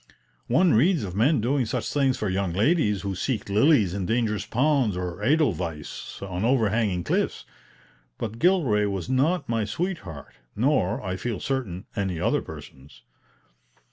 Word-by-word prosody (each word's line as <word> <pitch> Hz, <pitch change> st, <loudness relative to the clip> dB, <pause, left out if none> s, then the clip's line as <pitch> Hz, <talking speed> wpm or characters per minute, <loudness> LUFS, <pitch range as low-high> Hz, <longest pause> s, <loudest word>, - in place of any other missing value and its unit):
One 165 Hz, +8 st, +4 dB
reads 155 Hz, -, +3 dB
of 90 Hz, -2 st, -5 dB
men 125 Hz, +5 st, +3 dB
doing 130 Hz, +1 st, +1 dB
such -, -, -3 dB
things 135 Hz, -3 st, +2 dB
for 105 Hz, -, -2 dB
young 95 Hz, -2 st, -1 dB
ladies 105 Hz, -, +2 dB
who 100 Hz, -1 st, -2 dB
seek 115 Hz, +5 st, -2 dB
lilies 105 Hz, -, +4 dB
in 95 Hz, -2 st, -3 dB
dangerous 110 Hz, -2 st, 0 dB
ponds 130 Hz, -6 st, +1 dB
or 90 Hz, +1 st, -4 dB
edelweiss 90 Hz, -, -1 dB
on 95 Hz, 0 st, -4 dB
overhanging 110 Hz, -6 st, +1 dB
cliffs. -, -, -1 dB, 0.7 s
But 115 Hz, 0 st, -5 dB
Gilray 140 Hz, -, +3 dB
was 95 Hz, -4 st, -4 dB
not 140 Hz, +4 st, +1 dB
my 115 Hz, -1 st, 0 dB
sweetheart, 105 Hz, -, -5 dB, 0.2 s
nor, 125 Hz, 0 st, +1 dB
I 95 Hz, 0 st, -2 dB
feel 115 Hz, +1 st, -3 dB
certain, 115 Hz, -8 st, -3 dB
any 95 Hz, -5 st, -2 dB
other -, -, +1 dB
person's. 65 Hz, +1 st, -12 dB
110 Hz, 145 wpm, -25 LUFS, 95-135 Hz, 0.7 s, One